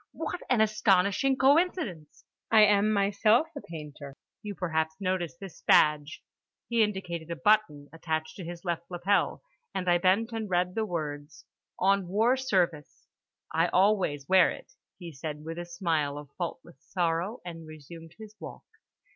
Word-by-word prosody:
"What 360 - -5
an 250 -3 +3
astonishing 215 +4 +2
coincidence! 270 - +1 0.2
I 220 -1 +6
am 210 0 +4
myself 215 +7 +2
a 285 - -6
painter. 150 -4 -10 0.2
You 205 -1 -6
perhaps 160 -3 -1
noticed 185 -3 -2
this 195 -4 -10
badge"—he 150 +9 +1
indicated 180 -6 -2
a 170 - -3
button 205 -8 +2
attached 160 -1 -3
to 190 - -7
his 175 +2 -8
left 170 -1 -3
lapel, 180 +3 0 0.3
and 185 -1 -3
I 175 0 +4
bent 195 +6 +2
and 225 -2 -4
read 180 0 +1
the 220 +1 -1
words: 150 -4 -6 0.3
On 195 0 +2
War 220 +7 +2
Service. 180 - -1 0.5
"I 165 +2 +3
always 180 -8 +1
wear 190 -2 +5
it," - - -9 0.2
he 175 -3 -9
said 150 +1 -7
with 165 +1 -5
a 175 - -5
smile 165 -5 -1
of 145 -1 -10
faultless 170 -5 -6
sorrow, 175 +5 -2
and 165 -2 -8
resumed 160 +2 -12
his 215 -1 -12
walk. - - -9
180 Hz, 150 wpm, -28 LUFS, 160-210 Hz, 0.5 s, I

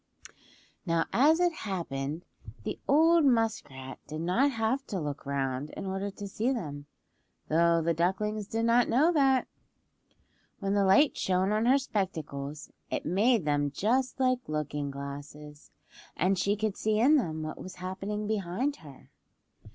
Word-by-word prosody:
Now 165 -3 +1
as 305 +7 +5
it 350 -1 +3
happened 165 - -4 0.4
the - - -4
old 325 +3 +5
muskrat 225 - 0
did 155 +1 -5
not 185 +12 +2
have 230 +2 -1
to 195 - -3
look 145 -3 -5
round 135 0 -2
in - - -5
order 195 +1 -2
to 200 +1 -8
see 225 +6 -1
them, 145 - -5 0.6
though 170 +1 +3
the 170 +1 +2
ducklings 195 +5 -1
did 225 +1 -1
not 235 +1 +4
know 290 +9 +4
that. 270 -4 +3 1.1
When 195 0 -2
the 200 -1 +3
light 195 +10 +5
shone 185 +1 +1
on 215 +2 +1
her 265 +2 +6
spectacles 155 - -4 0.2
it - - -3
made 210 +2 +2
them 145 -1 +1
just 250 - 0
like 255 -1 +2
looking 150 -1 -2
glasses, 145 +2 -9 0.5
and 185 +4 +2
she 200 +2 +1
could 210 -1 -2
see 215 0 0
in 285 +7 +6
them 160 - -2
what 155 - -6
was 185 - -8
happening 195 +3 -4
behind 215 +6 -1
her. 145 -5 -15
195 Hz, 150 wpm, -29 LUFS, 155-230 Hz, 1.1 s, her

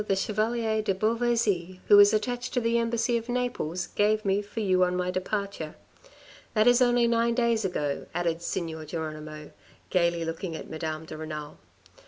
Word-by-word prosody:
the 195 - +2
Chevalier 220 +2 0
de 200 -3 0
Beauvaisis, 215 -4 0
who 205 - +8
is 205 0 +8
attached 245 +4 -2
to - - +3
the 235 0 +1
Embassy 235 +1 +1
of 230 +1 -7
Naples, 240 -9 -2
gave 215 +1 +1
me 195 +1 +2
for 205 +2 -7
you 185 -3 +3
on 180 0 +1
my 180 0 -1
departure. 185 -3 -3 0.8
That 215 0 +4
is 245 +1 +5
only 240 -1 +4
nine 235 0 +2
days 235 -2 +2
ago, 150 -7 -2
added 170 -1 -1
Signor 165 -3 -4
Geronimo, 155 -1 -6 0.4
gaily 170 -2 +2
looking 165 +1 -4
at - - -7
Madame 160 0 -4
de 155 - -8
Renal. 155 -1 -7
200 Hz, 170 wpm, -27 LUFS, 165-230 Hz, 0.8 s, who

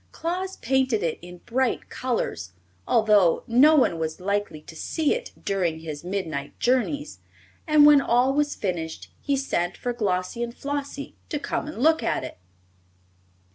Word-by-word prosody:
Claus 370 +3 -3
painted 260 -3 +1
it 165 -2 -1
in 175 0 -11
bright 260 +1 0
colors, 95 - -3 0.3
although 210 -6 +4
no 275 +7 +6
one 210 - +3
was 160 -1 -3
likely 200 -4 -2
to 160 - -13
see 310 - 0
it - - -5
during 175 -5 -1
his 155 -2 -7
midnight 165 -7 -4
journeys, 260 +4 0 0.5
and 305 -1 +6
when 295 -1 +8
all 250 +1 +2
was 295 +1 0
finished 165 -5 -4
he 280 -1 0
sent 175 -10 -1
for 245 - -3
Glossie 195 -1 -1
and 235 0 -4
Flossie 285 0 -4 0.2
to 295 - -1
come 295 - -3
and 305 - -7
look 320 +1 +4
at - - -1
it. 130 - -8
235 Hz, 155 wpm, -25 LUFS, 175-285 Hz, 0.5 s, when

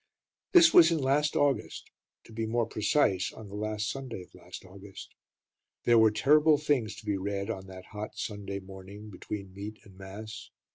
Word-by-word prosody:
This 340 -2 +8
was 165 -1 +8
in 165 - +1
last 145 +1 +1
August, 140 -2 0 0.3
to 115 - -15
be 110 0 -3
more 115 +1 +1
precise, 105 -3 +1
on 110 -2 -11
the 100 - -8
last 105 0 -2
Sunday 125 -7 -5
of - - -21
last 90 +1 -11
August. 95 +1 -12 0.7
There 120 -1 +5
were 110 0 +6
terrible 150 +7 +4
things 135 -8 0
to 110 - -12
be 105 -2 0
read 100 +2 -3
on 95 -3 -7
that 95 -1 -11
hot 105 0 -6
Sunday 100 -2 -5
morning 95 +2 -11
between 100 0 -7
meat 105 +2 -7
and 100 -4 -17
mass. 105 +3 -9
105 Hz, 180 wpm, -29 LUFS, 100-120 Hz, 0.7 s, This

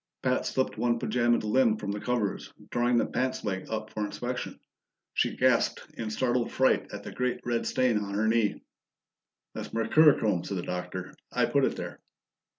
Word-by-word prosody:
Pat 130 0 +1
slipped 130 -4 -1
one 120 0 +2
pajamaed 120 0 +1
limb 110 0 +3
from 100 -1 -4
the 105 - -3
covers, 115 -3 -1 0.2
drawing 120 0 +2
the - - +3
pants 130 0 -1
leg 95 -3 -3
up 110 -1 -4
for 105 - -3
inspection. 120 +4 -4 0.5
She - - 0
gasped - - +2
in 110 -2 -4
startled 120 +2 0
fright 130 0 +2
at 105 0 -7
the - - -7
great 125 0 -1
red 120 -1 0
stain 125 -4 +2
on 100 -1 -4
her 110 +2 +1
knee. 110 -2 +1 0.9
"That's - - -6
mercurochrome," 115 - +4
said 100 - -3
the 90 - -3
Doctor. 90 0 -5 0.2
"I - - +2
put - - +2
it - - -1
there." - - -6
115 Hz, 175 wpm, -28 LUFS, 105-125 Hz, 0.9 s, mercurochrome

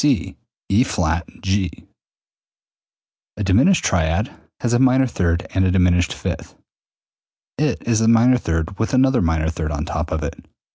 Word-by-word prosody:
C 140 -6 +1 0.4
E[flat] 90 -7 +1 0.2
G. 95 -1 0 1.7
A 105 - -3
diminished 120 - +3
triad 85 +5 0 0.3
has 120 -1 0
a 120 - +3
minor 130 0 +4
third 85 -8 -1
and 95 - +2
a 95 - +2
diminished 90 -1 +2
fifth, - - -6 1.0
i.e., 155 - +2
it 150 - -2
is 115 -2 +2
a 110 - +2
minor 120 +2 +5
third 80 0 -3
with 110 +4 0
another 130 -2 +3
minor 80 -2 0
third 80 -2 -4
on 75 +1 -3
top 80 0 -4
of 80 0 -2
it. 75 - -6
95 Hz, 155 wpm, -20 LUFS, 85-120 Hz, 1.7 s, minor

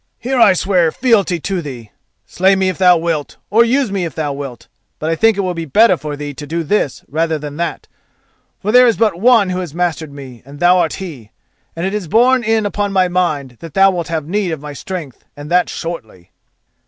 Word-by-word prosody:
Here 260 +1 -2
I 230 - +7
swear 180 -3 +1
fealty 205 -8 +1
to 190 0 -2
thee. 125 -8 -9 0.3
Slay 190 +3 +2
me 190 -1 +1
if 185 - -5
thou 180 -2 +6
wilt, 165 -3 -3
or 225 +3 +6
use 250 -1 +1
me 195 -2 -1
if 165 -5 -5
thou 150 -3 -2
wilt, 140 -4 -8 0.3
but 155 +1 -2
I - - +1
think 225 +3 +3
it - - +1
will 185 -2 -2
be 165 -1 -5
better 210 - +4
for 150 -3 -6
thee 145 0 -6
to 145 +1 -9
do 165 +2 -2
this 155 -4 -1
rather 160 +2 -1
than 145 0 -7
that, 170 0 -4 0.7
for 210 - -2
there 250 +1 +7
is 230 - +2
but 215 -6 +1
one 225 -5 +4
who 180 - -2
has 170 -4 -6
mastered 165 -4 -2
me, 135 -4 -11
and 140 +2 -13
thou 180 +1 +4
art 165 -3 0
he, 145 - -8 0.5
and 165 +2 -3
it 195 - -2
is 210 -5 -3
borne 245 +7 +3
in 220 -1 +1
upon 205 0 -2
my 185 -2 +2
mind 150 -9 -1
that 165 -3 -11
thou 195 0 +5
wilt 175 -3 -3
have 160 -3 -3
need 200 +1 -1
of 160 -3 -3
my 150 0 -8
strength, 155 -4 -7
and 145 +2 -9
that 180 0 +3
shortly." 110 - -7
175 Hz, 230 wpm, -16 LUFS, 150-195 Hz, 0.7 s, I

